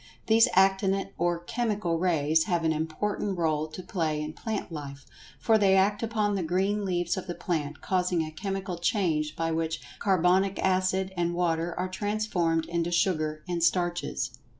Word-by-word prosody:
These 225 +1 +5
Actinic 195 +1 +2
or 175 0 +1
Chemical 210 -6 -1
Rays 160 -3 +2
have 175 -5 0
an 160 -1 +2
important 185 +5 -2
role 155 -2 0
to 160 +4 -9
play 160 -4 -1
in 150 0 -4
plant 220 -3 -4
life, 140 -3 -7 0.3
for 220 -1 +3
they 195 -2 +4
act 200 +2 +3
upon 215 -2 0
the 195 - -1
green 190 +5 0
leaves 175 -1 0
of 185 - -5
the 175 - -4
plant, 155 -4 -3
causing 180 -3 +1
a 155 - -6
chemical 190 +1 -4
change 165 -5 0
by 165 -1 -1
which 160 0 -1 0.2
carbonic 190 +1 +2
acid 190 0 +1
and 175 -1 0
water 170 -1 0
are 185 - 0
transformed 185 -5 0
into 170 0 -1
sugar 155 -4 0
and 175 -2 -1
starches. 175 - 0
175 Hz, 165 wpm, -28 LUFS, 160-195 Hz, 0.3 s, These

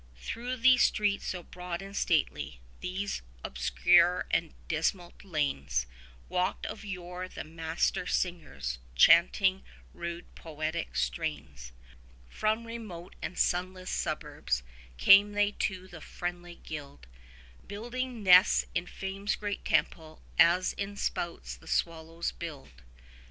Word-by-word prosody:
Through 245 - -4
these 255 +1 +6
streets 205 -2 +2
so 180 -2 -3
broad 180 -1 -6
and 195 +1 -9
stately, 75 - 0 0.2
these 190 - -3 0.2
obscure 65 - +3
and 165 -1 0
dismal 170 +2 -1
lanes, 105 - -1 0.4
Walked 185 +1 -1
of - - -6
yore 180 -2 -5
the - - -7
Master 165 +2 -1
singers, 70 - -2 0.2
chanting 185 - +5 0.3
rude 170 0 -6
poetic 160 +1 -4
strains. 70 - -3 0.6
30 - - -18
From 220 +2 +1
remote 215 -7 -8
and 180 - -5
sunless 185 +1 0
suburbs - - -2 0.3
came 200 - +7
they 205 0 +3
to 185 -2 -3
the 175 -4 -11
friendly 175 +1 -5
guild, 145 - -8 0.6
Building 240 +3 -4
nests 180 -1 +7
in 180 - -1
Fame's 195 +3 -3
great 205 -1 -4
temple, 155 -1 0 0.2
as 180 +2 +5
in 200 0 -5
spouts 170 -3 -3
the - - -18
swallows 165 0 -1
build. 140 - -9
175 Hz, 120 wpm, -30 LUFS, 160-195 Hz, 0.6 s, came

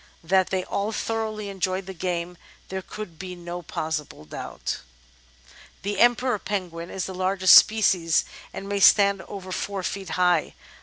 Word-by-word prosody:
That 185 +2 +2
they 190 -1 -1
all 200 +4 -2
thoroughly 220 -1 -3
enjoyed 190 0 -2
the 190 - -7
game, 180 0 -3 0.3
there 190 0 -3
could 185 -4 -9
be 185 -1 -6
no 175 0 -6
possible 155 - -4
doubt." 75 - -5 0.6
^ - - -22 0.3
The 200 0 -2
Emperor 245 -1 +3
Penguin 180 -4 -4
is 190 - -3
the 190 - -6
largest 185 0 +4
species 185 -7 +5 0.3
and 195 - -7
may 200 0 -1
stand 200 0 +6
over 190 -2 -8
four 195 +1 -3
feet 195 -1 -4
high. 180 -3 +2
190 Hz, 155 wpm, -25 LUFS, 175-200 Hz, 0.6 s, stand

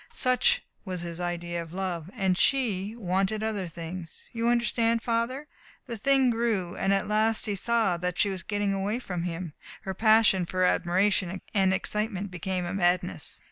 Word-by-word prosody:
Such 480 - +3 0.2
was 185 -3 -4
his 170 0 -6
idea 175 -1 -3
of 165 0 -9
love. 180 -3 -3
And 190 -4 +1
she 215 -4 +1
wanted 195 0 0
other 210 -4 -2
things. 165 +1 -8
You 230 0 -1
understand, 235 -1 +2
Father?... 245 +5 -1 0.4
The 235 - -5
thing 265 +2 +3
grew, 225 -7 -1
and 195 - 0
at 195 -1 +1
last 215 +1 +2
he 205 - -1
saw 220 -2 +1
that 180 0 -3
she 205 - +3
was 190 -2 -4
getting 205 +1 -1
away 195 +3 -1
from 180 -8 -4
him. 170 -2 -4 0.3
Her 190 - -3
passion 215 -3 +4
for 185 +1 0
admiration 185 +1 +2
and 190 -2 +3
excitement 205 0 -2
became 180 +1 -2
a 175 - -3
madness. 180 -1 0
195 Hz, 170 wpm, -28 LUFS, 180-225 Hz, 0.4 s, passion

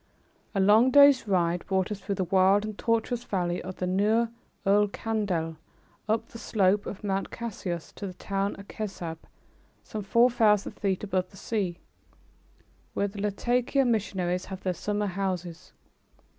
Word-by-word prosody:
A - - +2
long 210 +6 +6
day's 280 -3 +7
ride 175 -3 +1
brought 190 +1 0
us 205 - -3
through 200 0 -3
the 190 - 0
wild 190 +3 +4
and 215 -1 -5
tortuous 230 +2 0
valley 175 -5 -1
of 185 +1 -7
the 180 - -3
Nahr 210 +5 +2 0.4
ul 205 +1 +4
Kandil, 195 -7 -2 0.5
up 225 +1 +1
the 230 - -10
slope 205 -2 +1
of 200 - -7
Mount 195 -1 -1
Cassius 190 -7 -5
to 200 - -6
the 185 - -8
town 195 +1 -2
of 200 - -11
Kessab, 175 -6 -5 0.6
some 215 - -5
four 235 +5 +4
thousand 210 -4 +3
feet 195 -1 -2
above 185 -3 -1
the 195 - -16
sea, 190 -5 -2 1.2
where 200 - +1
the 200 0 -7
Latakia 245 +6 +1
missionaries 190 -6 0
have 190 -1 -8
their 185 - 0
summer 205 +3 -2
homes. 185 -3 -4
200 Hz, 155 wpm, -27 LUFS, 185-220 Hz, 1.2 s, day's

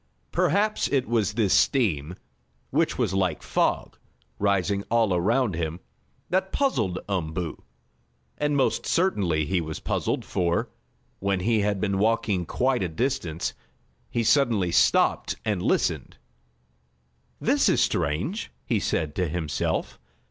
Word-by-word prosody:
Perhaps 210 +1 +1
it 135 -3 0
was 110 -3 +1
this 105 -4 +2
steam, 95 - +2 0.6
which - - +1
was - - 0
like 95 -5 0
a - - -12
fog, - - 0 0.4
rising 100 0 +1
all 115 -4 +3
around 110 +6 +1
him, 80 0 -3 0.5
that 190 +1 +1
puzzled 110 - 0
Umboo. 85 -4 -3 0.8
And 150 -1 +1
most 135 - +1
certainly 95 - +1
he 90 +3 0
was 80 -1 -5
puzzled, - - -2
for, 85 -3 0 0.5
when 100 -1 0
he 110 +3 +2
had 100 -1 0
been 100 -1 0
walking 105 -5 +1
quite 130 -2 +1
a 90 - -1
distance, 90 - -2 0.6
he 120 - -1
suddenly 115 -8 +3
stopped 65 -6 +3
and 105 -4 0
listened. - - 0 1.2
"This - - +3
is - - +3
strange," 90 - 0 0.2
he 115 - +1
said 80 -5 -1
to 90 -2 +1
himself. 80 -2 -2
100 Hz, 130 wpm, -25 LUFS, 85-120 Hz, 1.2 s, all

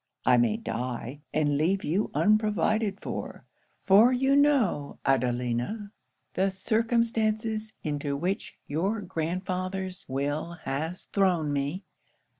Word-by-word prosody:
I 125 0 +6
may 120 -3 +3
die, 125 +4 -4
and 145 -2 +1
leave 190 +5 +1
you 185 +8 0
unprovided 210 -1 +2
for; - - -6 0.4
for 210 +6 +7
you 265 +2 +3
know, 275 - +2
Adelina, 125 - 0 0.4
the 195 +1 +2
circumstances 220 +1 0
into 145 -1 -2
which 180 +6 -3
your 190 +9 -1
grandfather's 185 +2 -3
will 145 +5 -2
has 155 +7 -3
thrown 175 -7 +1
me. 145 +7 -2
185 Hz, 105 wpm, -28 LUFS, 145-215 Hz, 0.4 s, for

